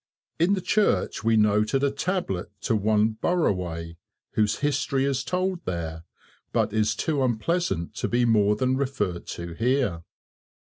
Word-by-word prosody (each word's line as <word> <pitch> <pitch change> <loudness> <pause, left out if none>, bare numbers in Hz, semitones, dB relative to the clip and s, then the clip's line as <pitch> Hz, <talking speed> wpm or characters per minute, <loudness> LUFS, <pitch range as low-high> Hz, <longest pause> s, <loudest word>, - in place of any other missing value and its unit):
In 175 +5 +4
the 190 - -3
church 210 - +1
we 115 0 +3
noted 105 +5 +2
a 140 - +3
tablet 140 - -2
to 115 - +1
one 110 +1 +2
Burraway, 90 - -1 0.3
whose 105 -1 +1
history 140 -2 +1
is 135 -1 0
told 185 +1 -1
there, 80 -2 -4 0.5
but - - 0
is 110 0 +1
too 150 -4 -1
unpleasant 120 - -1
to - - -1
be 120 0 +2
more 105 -3 +4
than 130 +4 +1
referred 105 -11 -2
to 85 0 -6
here. 115 -5 0
115 Hz, 145 wpm, -25 LUFS, 100-140 Hz, 0.5 s, In